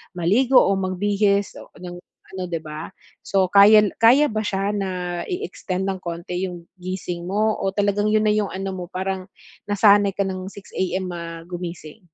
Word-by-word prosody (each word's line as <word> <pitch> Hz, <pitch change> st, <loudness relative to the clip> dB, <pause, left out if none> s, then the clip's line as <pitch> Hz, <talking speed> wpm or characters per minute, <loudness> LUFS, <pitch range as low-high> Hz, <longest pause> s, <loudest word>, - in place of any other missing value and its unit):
maligo 230 Hz, +10 st, +4 dB
o 195 Hz, 0 st, +1 dB
magbihis 200 Hz, +2 st, 0 dB
o -, -, -15 dB
ng 175 Hz, 0 st, -9 dB, 0.3 s
ano, 185 Hz, -1 st, -5 dB
di 165 Hz, -2 st, -4 dB
ba? 155 Hz, 0 st, -7 dB, 0.3 s
So, 190 Hz, -2 st, 0 dB
kayal 210 Hz, +1 st, +7 dB
kaya 250 Hz, +5 st, +5 dB
ba 215 Hz, -, -1 dB
siya 200 Hz, -1 st, -1 dB
na 200 Hz, -2 st, -2 dB, 0.4 s
i-extend 280 Hz, -, -4 dB
ng 190 Hz, -1 st, -2 dB
konti 175 Hz, +2 st, -4 dB
yung 175 Hz, -1 st, -8 dB, 0.2 s
gising 180 Hz, -1 st, -5 dB
mo 215 Hz, +3 st, 0 dB
o 195 Hz, 0 st, -2 dB
talagang 205 Hz, 0 st, +1 dB
yun 215 Hz, 0 st, +2 dB
na 210 Hz, -, +3 dB
yung 210 Hz, -1 st, +1 dB
ano 190 Hz, 0 st, -4 dB
mo, 180 Hz, -1 st, -5 dB
parang 185 Hz, +1 st, -4 dB, 0.4 s
nasanay 205 Hz, -1 st, +4 dB
ka 200 Hz, -, +1 dB
ng 185 Hz, -1 st, -4 dB
6:00 200 Hz, 0 st, -12 dB
AM 185 Hz, 0 st, -2 dB
ma 165 Hz, -1 st, -7 dB
gumising? 175 Hz, -3 st, -7 dB
190 Hz, 175 wpm, -22 LUFS, 180-205 Hz, 0.4 s, kayal